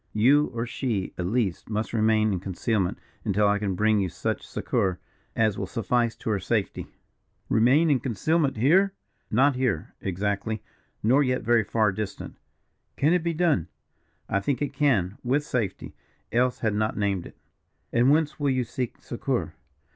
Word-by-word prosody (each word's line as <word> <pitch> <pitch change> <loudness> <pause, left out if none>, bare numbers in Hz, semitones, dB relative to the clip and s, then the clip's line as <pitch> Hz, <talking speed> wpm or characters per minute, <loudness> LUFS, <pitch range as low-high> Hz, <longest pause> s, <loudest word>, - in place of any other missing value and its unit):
You, 140 +7 +4
or 115 -1 -4
she, 115 -6 -2
at 90 - -1
least, 105 -4 -1
must 110 +1 -2
remain 110 -1 +3
in 90 - -1
concealment 95 +1 -1 0.3
until 105 +1 +2
I 105 0 +2
can 100 -3 -1
bring 105 +2 +3
you 95 -2 0
such - - -3
succour 95 -2 -1 0.4
as 110 -3 +1
will - - -3
suffice 115 +1 0
to 110 - -3
her 100 - +1
safety." 105 +2 -2 0.6
"Remain 140 +8 +4
in 135 - +3
concealment, 140 - 0
here?" 190 - +4 0.3
"Not 135 +5 +3
here, 125 -11 -1
exactly, 100 +3 -2 0.4
nor 130 +7 +4
yet 130 -2 0
very 115 -1 +3
far 110 0 +1
distant." 100 0 -6 0.6
"Can 150 +4 +3
it 180 - +2
be 170 0 -1
done?" 155 - +2 0.6
"I 100 - +1
think 125 +5 -1
it 145 - -2
can, 110 - +1
with 135 +4 +1
safety 120 -9 -3 0.4
else 125 +1 +2
had 110 -2 +1
not 110 +1 -1
named 100 -4 -1
it." - - -16 0.6
"And 120 +3 +4
whence 155 +1 +2
will 145 -1 +1
you 130 -1 +1
seek 120 +1 -5
succour?" - - -2
115 Hz, 165 wpm, -26 LUFS, 100-135 Hz, 0.6 s, You